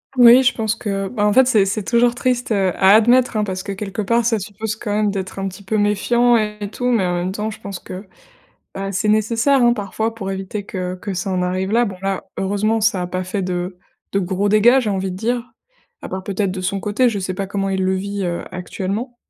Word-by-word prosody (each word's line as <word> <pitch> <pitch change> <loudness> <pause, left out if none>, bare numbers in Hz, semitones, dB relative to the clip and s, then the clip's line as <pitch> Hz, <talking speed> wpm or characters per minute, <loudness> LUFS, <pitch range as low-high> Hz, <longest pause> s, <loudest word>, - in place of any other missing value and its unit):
Oui, 245 0 +8
je 260 - +3
pense 220 -1 -1
que, 195 -4 -3
ben, 210 -4 -1
en 210 - +3
fait, 260 +1 +6
c'est 215 -6 +4
c'est 200 +1 -2
toujours 240 +1 +2
triste, 245 -1 -1
heu, 195 -3 +2
à 190 0 +5
admettre, 240 +2 +4
hein, 210 - +1
parce 185 -2 -3
que, 200 0 -5
quelque 195 +1 -4
part, 230 +3 +1
ça 225 -2 +2
suppose, 205 +2 -5
quand 215 - -4
même, 210 -1 +1
d'être 190 -1 -5
un 195 0 -2
petit 190 +2 -12
peu 215 +3 -1
méfiant 235 +4 +3
et 210 -1 -3
tout 245 - -5
mais 225 -7 +2
en 180 - 0
même 175 +2 -2
temps 215 +1 -3
je - - -10
pense 200 -2 -7
que, 185 +3 -9 0.7
bah, 195 0 -4
c'est 195 +2 -1
nécessaire, 230 +5 +3
hein, 240 0 +5
parfois, 220 +2 -3
pour 195 -4 -5
éviter 195 +2 -5
que 185 -2 -4
que 195 +1 -5
ça 185 +2 -3
en 185 - 0
arrive 185 +2 -1
là. 240 +2 +3
Bon, 195 -4 -5
là, 195 0 -2
heureusement, 210 +3 0
ça 205 -4 +2
a 180 - -2
pas 185 +1 -3
fait 185 +2 -3
de 180 0 -3 0.3
de 195 - +2
gros 195 +2 0
dégâts, 235 +6 +5
j'ai 215 - -1
envie 190 -1 -2
de - - -7
dire. 235 +4 -1 0.6
À - - -6
part, 190 0 -5
peut-être, 200 0 -1
de 185 - -5
son 190 +1 -2
côté. 210 +6 +2
Je 210 -3 -2
sais 185 0 -3
pas 195 +1 -3
comment 195 0 -2
il 190 0 0
le 190 0 +1
vit, 200 +1 -3
heu, 175 -1 -2
actuellement. 195 +7 -4
200 Hz, 250 wpm, -20 LUFS, 190-225 Hz, 0.7 s, Oui